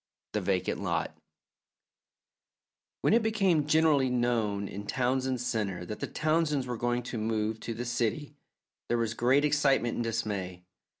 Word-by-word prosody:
THE - - -1
VACANT - - -1
LOT - - -1 1.9
When - - +3
it 235 - +5
became 195 -9 +2
generally 150 -4 +4
known 115 -5 0
in 100 +1 -7
Townsend 130 +1 0
Centre 105 -7 -2
that 105 - -6
the - - -3
Townsends 155 -3 +1
were 125 -1 -3
going 120 +1 -1
to 120 -1 -5
move 110 0 -1
to 115 - -5
the 120 +2 -4
city, 120 +5 -1 0.5
there 120 - +1
was 115 -1 0
great 130 +5 +3
excitement 140 -5 +2
and 120 - -2
dismay. 100 -6 -3
120 Hz, 145 wpm, -29 LUFS, 110-145 Hz, 1.9 s, it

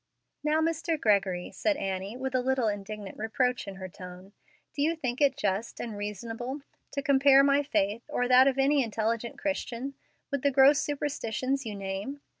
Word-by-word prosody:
"Now, 305 +1 +2
Mr. 325 0 0
Gregory," 195 -5 +1
said 310 -2 0
Annie, 195 +1 -3
with 265 0 -3
a 255 - +2
little 260 -2 +1
indignant 205 -1 -5
reproach 245 +2 0
in 195 - -6
her 190 -1 -7
tone, 180 +2 -11 0.4
"do 285 - -3
you 320 +3 +2
think 260 -4 -3
it 275 -2 +4
just 205 +3 -2
and 230 -3 -5
reasonable 225 +6 -5 0.3
to 280 - -2
compare 275 0 +6
my 280 +1 +4
faith, 215 -6 0
or 245 - 0
that 255 +1 +7
of 270 -1 +2
any 275 +1 +3
intelligent 230 +1 -2
Christian, 275 -2 -3 0.4
with 280 -2 -1
the 285 - +3
gross 275 +2 +6
superstitions 275 -3 -2
you 210 - -4
name? 195 +8 -5
250 Hz, 175 wpm, -28 LUFS, 205-280 Hz, 0.4 s, that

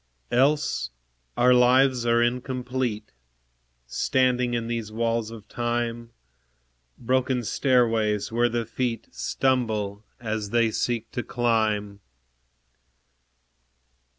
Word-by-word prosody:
Else 140 - +2 0.5
our 125 +1 +5
lives 125 0 +4
are 120 0 +4
incomplete, 125 -2 -2 0.7
Standing 125 - +1
in 115 -1 -2
these 115 -2 -4
walls 115 0 -1
of 110 -2 -11
Time, 120 0 -2 0.9
Broken 130 0 0
stairways, 115 -3 +1
where 120 +1 +2
the 120 0 -2
feet 115 0 -3
Stumble 110 -6 -1 0.2
as 110 -3 -3
they 115 0 +2
seek 115 0 -2
to 120 - -2
climb. 110 -4 0
120 Hz, 95 wpm, -25 LUFS, 110-125 Hz, 0.9 s, our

